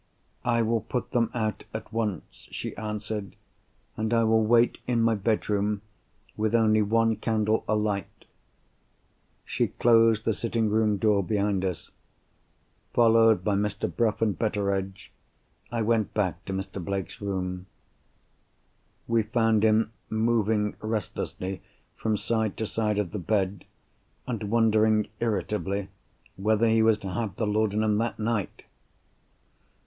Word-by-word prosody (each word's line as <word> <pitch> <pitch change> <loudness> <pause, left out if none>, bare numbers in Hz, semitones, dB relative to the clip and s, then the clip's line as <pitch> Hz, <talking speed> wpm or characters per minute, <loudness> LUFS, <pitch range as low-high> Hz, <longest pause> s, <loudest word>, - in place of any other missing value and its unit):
"I 115 -1 +2
will 115 0 +1
put 125 - -4
them 115 -2 +2
out 110 -3 -2
at - - -7
once," 105 -6 -4
she - - -5
answered. 105 -1 -5 0.6
"And 110 +1 0
I 115 - +3
will 110 0 +3
wait 120 +2 +3
in 120 -2 +1
my 115 0 +3
bedroom, 105 -1 0 0.5
with 110 +1 0
only 110 -1 +4
one 115 +2 +2
candle 110 0 0
alight." 105 -3 -2 1.2
She - - 0
closed 115 -2 +3
the 110 - +2
sitting 115 -1 -1
room 110 -1 +2
door 105 -1 +2
behind 100 -1 0
us. 90 -6 -4 1.0
Followed 115 -4 +5
by 105 - +1
Mr. 105 +1 -1
Bruff 115 -1 +1
and 105 -3 0
Betteredge, 100 -3 -2 0.6
I 115 -2 -1
went 110 -1 0
back 95 -6 -1
to 95 - -4
Mr. 95 -1 -4
Blake's 100 +1 -4
room. 90 -2 -3 1.4
We 115 -1 +3
found 110 0 +2
him 110 0 +3 0.2
moving 110 -2 +1
restlessly 95 -3 -3 0.3
from 110 -1 -1
side 110 -1 -1
to 110 - -2
side 105 +1 -1
of 100 -5 -1
the 105 - -4
bed, 95 0 -1 0.6
and 115 -4 -4
wondering 110 -1 +3
irritably 100 -2 -2 0.5
whether 110 +3 +2
he 110 0 +4
was 110 -1 +4
to 95 - -5
have 110 -3 -3
the 110 - -1
laudanum 105 0 +1
that 115 +2 -1
night. 110 -3 -2
110 Hz, 135 wpm, -27 LUFS, 100-115 Hz, 1.4 s, Followed